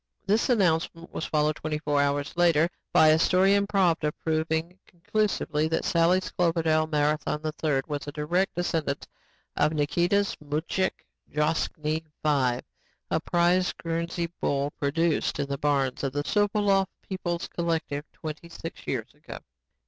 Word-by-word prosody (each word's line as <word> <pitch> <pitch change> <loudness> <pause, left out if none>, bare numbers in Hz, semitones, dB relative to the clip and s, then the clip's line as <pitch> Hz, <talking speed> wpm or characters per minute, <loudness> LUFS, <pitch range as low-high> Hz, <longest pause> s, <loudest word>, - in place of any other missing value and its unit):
This 210 +6 +2
announcement 170 -6 +1
was - - -3
followed 150 0 +1
twenty 155 -1 -3
four 145 -1 +1
hours 145 0 0
later 170 -2 +4 0.2
by 155 - +6
a 155 +1 +5
story 190 +3 +4
in 200 0 +2
Pravda 175 -6 +2
proving 160 +2 -1
conclusively 180 -5 -1
that 160 - -1
Sally's 175 +2 +2
Cloverdale 165 -2 +2
Marathon 150 0 0 0.2
III 145 -4 +2
was 145 -1 -4
a - - -3
direct 170 +6 0
descendant 165 -5 -1 0.5
of 155 - +2
Nikita's 175 +7 +1
Mujik 155 +6 -2 0.3
Droshky 155 +1 0 0.2
V, 130 -5 +2 0.5
a - - +2
prize 175 +1 +2
Guernsey 170 0 -3
bull 140 +1 0
produced 150 +2 0
in 145 - +1
the 140 -1 -3
barns 140 -3 0
of 135 -1 -1
the 145 0 -1
Sopolov 205 +2 +2 0.2
People's 175 -3 -3
Collective 160 -4 -2
twenty 155 +1 -7
six 165 0 -9
years - - -3
ago. - - -10
160 Hz, 140 wpm, -27 LUFS, 150-175 Hz, 0.5 s, by